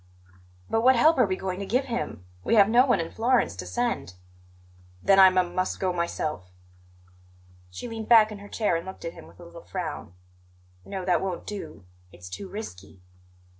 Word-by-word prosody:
"But 225 - +1
what 260 +2 +5
help 310 +5 +4
are 245 - +5
we 190 - -1
going 185 0 -4
to 200 - -4
give 255 +6 +1
him? 235 - -4 0.2
We - - +2
have 200 -2 +7
no 245 +4 +4
one 240 -7 +3
in 165 0 -4
Florence 235 - +1
to 90 -1 -6
send." 90 0 -2 0.9
"Then 195 0 +5
I 190 - +10
m 185 -1 +1
must 185 +1 -1
go 185 -1 0
myself." 155 - -3 1.2
She 90 - -7
leaned 225 -2 -7
back 220 -2 +7
in 210 - -8
her 205 0 -12
chair 215 -6 0
and 165 - -2
looked 190 -1 -9
at 165 - -4
him - - -13
with - - -19
a 175 - -11
little 170 0 -12
frown. 165 - -6 0.7
"No, 190 -2 -5
that 180 - +2
won't 185 -2 -4
do; 200 - -8 0.3
it's 90 0 -12
too 190 - -7
risky." 95 - -9
190 Hz, 195 wpm, -26 LUFS, 170-225 Hz, 1.2 s, I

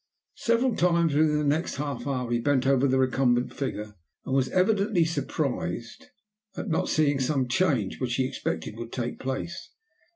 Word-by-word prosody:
Several 235 +1 +2
times 170 -3 +2
within 150 0 +3
the 150 - 0
next 150 +4 0
half 145 -1 -4
hour 125 -3 -2
he 120 - +2
bent 130 +1 +1
over 135 0 +3
the 130 0 +2
recumbent 130 -1 +2
figure, 105 -6 -4 0.3
and 130 - -3
was 135 -1 +2
evidently 195 -1 +2
surprised 165 +1 -3 0.5
at 215 - -4
not 160 - 0
seeing 145 -3 +2
some 130 0 0
change 130 - +1
which 120 -2 0
he 130 - +1
expected 80 -4 -4
would 115 0 -7
take 120 -1 -4
place. 135 +6 -4
135 Hz, 165 wpm, -27 LUFS, 125-160 Hz, 0.5 s, within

